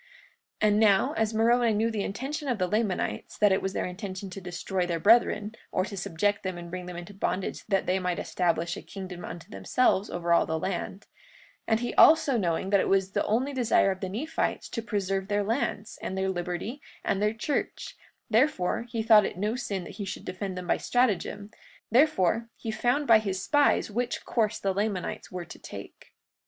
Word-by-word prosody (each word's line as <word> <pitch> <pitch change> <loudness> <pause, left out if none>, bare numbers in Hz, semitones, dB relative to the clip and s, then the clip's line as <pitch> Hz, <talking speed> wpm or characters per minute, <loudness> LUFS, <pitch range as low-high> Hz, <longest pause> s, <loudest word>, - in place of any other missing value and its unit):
43:29 215 - +6
And 210 0 +3
now, 205 -3 +4
as 220 -1 0
Moroni 230 +1 +3
knew 225 +2 +1
the 215 -2 -2
intention 270 +10 -4
of 250 -4 0
the 185 - +1
Lamanites, 210 0 -1
that 205 -1 +4
it 190 - +2
was 195 0 -2
their - - -1
intention 190 +1 -6
to 195 - -7
destroy 180 +1 -2
their 170 -1 -1
brethren, 215 0 +4 0.2
or 185 - +1
to 200 - -7
subject 200 +3 0
them 185 -2 -4
and 170 0 -8
bring 180 0 -5
them 180 - -7
into 175 +4 -8
bondage 195 -1 -2
that 195 -3 +1
they 185 +1 +1
might 180 -1 -1
establish 175 -3 0
a - - -7
kingdom 185 -3 -8
unto 170 0 -8
themselves 215 -4 +1
over 170 0 0
all 170 - +4
the 160 - -1
land; 190 +3 -3
43:30 - - -23 0.6
And 220 - +2
he 245 - -2
also 305 -4 +6
knowing 190 -2 0
that 200 - +5
it - - 0
was 195 0 +2
the - - 0
only 255 +6 +1
desire 240 -6 +3
of 190 - -5
the 190 - -4
Nephites 280 +12 -2
to 230 - -3
preserve 195 -3 -2
their 205 0 +1
lands, 220 -1 -2
and 190 - -4
their 190 0 0
liberty, 180 +9 -4 0.2
and 195 - 0
their 210 +1 +1
church, 280 +6 -3 0.3
therefore 230 -2 +1
he 225 -1 -2
thought 220 -2 +7
it - - -4
no 210 +4 -1
sin 200 -7 -3
that - - -10
he 205 - -4
should 190 - -6
defend 185 0 -4
them 180 - -5
by - - +2
stratagem; 210 -3 0 0.4
therefore, 230 - +3
he 225 - -4
found 245 +6 +1
by 230 -4 +7
his 195 -3 -3
spies 290 -6 +3
which 240 +3 -2
course 220 -2 0
the 195 -1 -1
Lamanites 200 -2 -3
were 180 -1 -5
to - - -11
take. - - -10
200 Hz, 205 wpm, -28 LUFS, 185-225 Hz, 0.6 s, thought